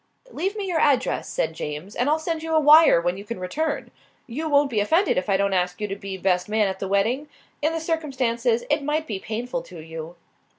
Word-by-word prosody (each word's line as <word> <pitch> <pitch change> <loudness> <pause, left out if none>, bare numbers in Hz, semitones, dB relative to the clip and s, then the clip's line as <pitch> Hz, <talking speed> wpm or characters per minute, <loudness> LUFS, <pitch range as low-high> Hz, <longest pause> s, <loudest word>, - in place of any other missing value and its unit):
"Leave 385 +3 -2
me 410 -2 -3
your 350 -4 0
address," 285 -4 +1
said - - -1
James, 150 +8 -6
"and 250 +4 +1
I'll 310 - +3
send 320 0 -3
you 320 0 -1
a - - +6
wire 305 - +7
when 175 +2 -1
you 200 - -8
can 210 -1 -6
return. 295 +12 -3 0.3
You 300 +6 -4
won't 285 -1 +3
be 220 - +1
offended 325 - +2
if 185 +3 -1
I 195 - +3
don't 200 0 +1
ask 180 0 0
you 210 - -2
to 195 - -4
be 195 -1 -6
best 180 0 0
man 215 -1 +2
at 190 0 -4
the 195 - -3
wedding? 225 +10 0 0.3
In 310 +2 +2
the 325 - -2
circumstances 260 -8 0
it 295 0 +2
might 305 +2 -1
be 205 -8 -4
painful 245 +5 -4
to 195 -9 -12
you." 160 +1 -8
240 Hz, 230 wpm, -24 LUFS, 195-310 Hz, 0.3 s, wire